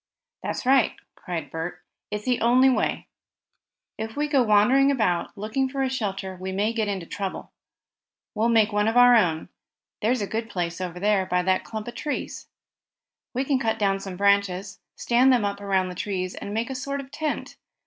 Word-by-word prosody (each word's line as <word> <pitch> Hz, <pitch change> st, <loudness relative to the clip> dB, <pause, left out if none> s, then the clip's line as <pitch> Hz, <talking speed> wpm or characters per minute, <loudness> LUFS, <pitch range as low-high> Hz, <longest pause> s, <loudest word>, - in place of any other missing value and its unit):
"That's -, -, -4 dB
right," 265 Hz, -2 st, +4 dB, 0.2 s
cried 165 Hz, -4 st, -6 dB
Bert. 175 Hz, +2 st, -5 dB, 0.3 s
"It's 210 Hz, 0 st, -4 dB
the 250 Hz, -1 st, +1 dB
only 255 Hz, +3 st, +5 dB
way. -, -, 0 dB, 0.9 s
If 220 Hz, 0 st, -5 dB
we 300 Hz, 0 st, +1 dB
go 285 Hz, -3 st, +3 dB
wandering 245 Hz, +5 st, +4 dB
about, 215 Hz, -11 st, +1 dB
looking 220 Hz, +6 st, -1 dB
for 270 Hz, 0 st, -2 dB
a 260 Hz, -, -1 dB
shelter, 195 Hz, -6 st, -3 dB
we 190 Hz, +1 st, -5 dB
may 205 Hz, +4 st, 0 dB
get 220 Hz, -2 st, -1 dB
into 195 Hz, -4 st, -3 dB
trouble. 195 Hz, +2 st, -5 dB, 0.8 s
We'll 225 Hz, +2 st, +1 dB
make 225 Hz, -2 st, +4 dB
one 210 Hz, +1 st, +2 dB
of 225 Hz, +2 st, +1 dB
our 245 Hz, 0 st, +8 dB
own. 170 Hz, -7 st, +1 dB, 0.5 s
There's 235 Hz, +2 st, +1 dB
a -, -, 0 dB
good 225 Hz, +2 st, -4 dB
place, 175 Hz, -2 st, -3 dB
over 185 Hz, +2 st, 0 dB
by 180 Hz, 0 st, +1 dB
that 185 Hz, +1 st, +1 dB
clump 220 Hz, 0 st, -6 dB
of 240 Hz, -, -5 dB
trees. 295 Hz, -1 st, -4 dB, 0.9 s
We 260 Hz, -, +1 dB
can 270 Hz, -2 st, +1 dB
cut 225 Hz, -3 st, 0 dB
down 195 Hz, -2 st, +1 dB
some 195 Hz, -2 st, -7 dB
branches, 200 Hz, -1 st, +1 dB, 0.2 s
stand 250 Hz, +2 st, +3 dB
them 240 Hz, -5 st, +3 dB
up 200 Hz, 0 st, -3 dB
around 190 Hz, -2 st, +1 dB
the -, -, -6 dB
trees 185 Hz, 0 st, -3 dB
and 200 Hz, -, -7 dB
make 225 Hz, +4 st, -2 dB
a -, -, -2 dB
sort 275 Hz, +2 st, -3 dB
of 270 Hz, -1 st, -9 dB
tent. 305 Hz, 0 st, -4 dB
210 Hz, 190 wpm, -25 LUFS, 190-245 Hz, 0.9 s, our